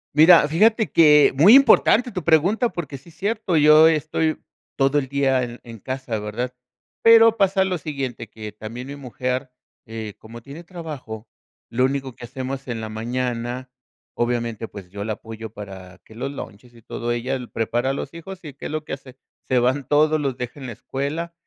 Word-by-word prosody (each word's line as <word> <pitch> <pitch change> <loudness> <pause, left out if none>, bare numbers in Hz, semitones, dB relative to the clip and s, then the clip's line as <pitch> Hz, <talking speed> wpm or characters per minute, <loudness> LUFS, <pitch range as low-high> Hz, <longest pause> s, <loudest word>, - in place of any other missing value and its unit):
Mira, 160 0 +7
fíjate 220 +8 +3
que 150 -4 +6
muy 180 - +8
importante 250 -2 +5
tu 180 -5 -5
pregunta 180 - +3
porque 145 - -6
sí 145 - -18
cierto. 200 0 -1
Yo 155 +1 +7
estoy 155 0 0 0.4
todo 135 +2 +3
el 135 - -4
día 135 -1 +1 0.2
en 115 -2 -11
casa, 130 -2 -4
¿verdad? 115 +4 -4 0.5
Pero 230 0 +7
pasa 195 -2 +2
lo 185 -2 -2
siguiente, 135 -7 -5
que 110 -1 -8
también 115 +5 -8
mi 140 - -7
mujer, 130 0 -4 0.4
eh, 110 -2 -6
como 115 +2 -11
tiene 145 +5 -10
trabajo, 150 - -8 0.4
lo 125 +2 +2
único 135 -1 -3
que 125 - -9
hacemos 130 +2 -6
en 120 -2 -4
la 110 0 -5
mañana 120 +2 -3 0.5
obviamente, 120 -2 -2
pues 95 -4 -11
yo 100 +1 -5
la 110 +1 -2
apoyo 110 0 -9
para 95 -4 -10
que - - -16
los 135 +5 -4
lunches 120 -3 -10
y 115 - -18
todo, 120 +2 -4
ella 120 +3 -2 0.2
prepara 120 +3 -1
a 135 - 0
los - - -6
hijos, 180 +2 -10
y, 150 - -8
¿qué 140 - -11
es - - -8
lo 155 0 -3
que - - -6
hace? 130 -1 -10 0.3
Se 130 - +1
van 130 +2 +1
todos, 155 +1 +3
los 135 -3 -2
deja 125 +3 -6
en 130 - -7
la 120 - -6
escuela, 145 +9 -4
135 Hz, 185 wpm, -22 LUFS, 120-155 Hz, 0.5 s, muy